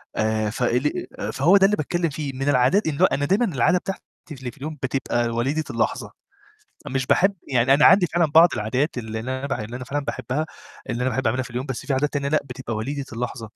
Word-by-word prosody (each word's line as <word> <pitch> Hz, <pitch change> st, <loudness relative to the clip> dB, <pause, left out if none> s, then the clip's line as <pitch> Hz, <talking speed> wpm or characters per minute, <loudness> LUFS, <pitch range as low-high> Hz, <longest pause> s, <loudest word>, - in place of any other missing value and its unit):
آآ، 110 Hz, 0 st, 0 dB
فاللي 125 Hz, +4 st, -1 dB
آآ، -, -, -3 dB
فهو 165 Hz, +9 st, +4 dB
ده 195 Hz, -, +5 dB
اللي 210 Hz, +1 st, +2 dB
باتكلّم 170 Hz, +3 st, -1 dB
فيه 140 Hz, -1 st, -4 dB
إن -, -, -9 dB
من 135 Hz, +1 st, 0 dB
العادات 145 Hz, +10 st, +3 dB
إن 145 Hz, -3 st, -2 dB
هو -, -, +8 dB
أنا 145 Hz, -, 0 dB
دايمًا 200 Hz, +10 st, +2 dB
العادة 170 Hz, -, +2 dB
بتاعتي 195 Hz, +1 st, -5 dB, 0.3 s
اللي 130 Hz, -4 st, -6 dB
في -, -, -22 dB
اليوم 150 Hz, +2 st, -6 dB
بتبقى 120 Hz, -2 st, 0 dB
وليدة 130 Hz, +7 st, -1 dB
اللحظة، -, -, -2 dB, 0.8 s
مش 130 Hz, -1 st, -1 dB
باحب 195 Hz, +2 st, +3 dB
يعني 125 Hz, 0 st, +3 dB
أنا 145 Hz, -, +5 dB
عندي 185 Hz, -3 st, +6 dB
فعلًا 170 Hz, 0 st, +2 dB
بعض 165 Hz, +2 st, +7 dB
العادات 130 Hz, +8 st, -1 dB
اللي 110 Hz, -2 st, -4 dB
اللي 130 Hz, +3 st, -3 dB
أنا 140 Hz, -, -4 dB
بح 140 Hz, -, -2 dB
اللي 110 Hz, +3 st, -6 dB
أنا 125 Hz, -, -8 dB
فعلًا 145 Hz, +2 st, -3 dB
باحبّها، 130 Hz, +5 st, -2 dB, 0.4 s
اللي 120 Hz, -, -2 dB
أنا 130 Hz, -, +1 dB
باحب 130 Hz, -1 st, -1 dB
أعملها 125 Hz, +3 st, 0 dB
في -, -, -10 dB
اليوم 125 Hz, +2 st, -4 dB
بس 130 Hz, -4 st, -5 dB
في 140 Hz, -, -1 dB
عادات 145 Hz, +3 st, 0 dB
تانية 140 Hz, -1 st, -1 dB
لأ، 155 Hz, +1 st, +3 dB
بتبقى 125 Hz, -3 st, -6 dB
وليدة 140 Hz, +6 st, -3 dB
اللحظة. 120 Hz, +1 st, -4 dB
135 Hz, 235 wpm, -23 LUFS, 125-150 Hz, 0.8 s, هو